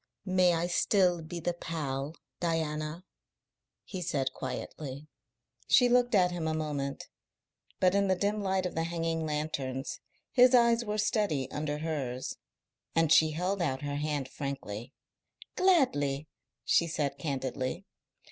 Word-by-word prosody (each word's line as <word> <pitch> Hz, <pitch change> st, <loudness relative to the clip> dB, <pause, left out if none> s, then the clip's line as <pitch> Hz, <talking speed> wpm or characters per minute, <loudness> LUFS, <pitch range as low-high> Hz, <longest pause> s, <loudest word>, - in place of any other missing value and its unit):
"May 185 Hz, -2 st, +4 dB
I 165 Hz, +1 st, 0 dB
still 180 Hz, 0 st, +2 dB
be 165 Hz, +2 st, -6 dB
the 175 Hz, +1 st, -1 dB
pal, 150 Hz, -3 st, -4 dB, 0.2 s
Diana?" 160 Hz, 0 st, -2 dB, 0.8 s
he 185 Hz, -3 st, -6 dB
said 135 Hz, -6 st, -1 dB
quietly. 140 Hz, +2 st, -6 dB, 0.6 s
She 250 Hz, -, +6 dB
looked 245 Hz, -1 st, +4 dB
at 180 Hz, -2 st, +4 dB
him 170 Hz, -2 st, -2 dB
a 155 Hz, -, 0 dB
moment, 145 Hz, -3 st, -3 dB, 0.7 s
but 185 Hz, 0 st, +4 dB
in 200 Hz, 0 st, +3 dB
the 190 Hz, -, +3 dB
dim 205 Hz, +3 st, 0 dB
light 190 Hz, -1 st, 0 dB
of 180 Hz, -, -2 dB
the 165 Hz, 0 st, -1 dB
hanging 165 Hz, -1 st, -1 dB
lanterns 145 Hz, -3 st, -3 dB, 0.3 s
his 250 Hz, 0 st, +6 dB
eyes 235 Hz, -1 st, +5 dB
were 210 Hz, -1 st, -2 dB
steady 200 Hz, -, 0 dB
under 150 Hz, 0 st, -2 dB
hers, 140 Hz, -5 st, -3 dB, 0.6 s
and 165 Hz, -2 st, +3 dB
she 160 Hz, -1 st, +6 dB
held 185 Hz, +4 st, -1 dB
out 135 Hz, -4 st, -1 dB
her 145 Hz, 0 st, -2 dB
hand 145 Hz, -2 st, -1 dB
frankly. 130 Hz, -5 st, -5 dB, 0.6 s
"Gladly," 155 Hz, -, +2 dB, 0.4 s
she 170 Hz, -, +3 dB
said 145 Hz, -3 st, -2 dB
candidly. 135 Hz, +3 st, -3 dB
160 Hz, 140 wpm, -30 LUFS, 145-185 Hz, 0.8 s, She